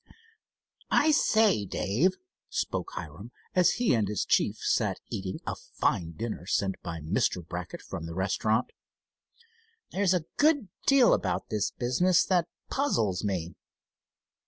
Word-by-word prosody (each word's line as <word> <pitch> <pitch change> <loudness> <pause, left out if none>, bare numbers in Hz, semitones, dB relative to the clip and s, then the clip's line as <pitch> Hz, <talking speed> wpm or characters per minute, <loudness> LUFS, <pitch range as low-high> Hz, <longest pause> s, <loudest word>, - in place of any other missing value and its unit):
"I 315 - +4
say, 220 - +3
Dave," 115 - +1 0.3
spoke - - -3
Hiram, 90 +11 -8 0.2
as 180 -1 +4
he 240 - +2
and 110 -4 +2
his 105 +1 -1
chief - - +2
sat - - 0
eating 95 -1 -4
a - - -2
fine 85 -1 -2
dinner 90 0 -5
sent 95 -1 0
by 80 -1 -6
Mr. 85 +1 0
Brackett - - -6
from 80 -1 -6
the 85 - -7
restaurant; 110 +5 0 1.2
"there's 190 -1 +2
a 170 -4 -1
good 290 - +3 0.2
deal 275 -3 +6
about - - -1
this 105 -2 0
business 175 +9 +2
that 180 -3 +2 0.2
puzzles 110 - 0
me." 90 -5 -2
110 Hz, 135 wpm, -28 LUFS, -, 1.2 s, deal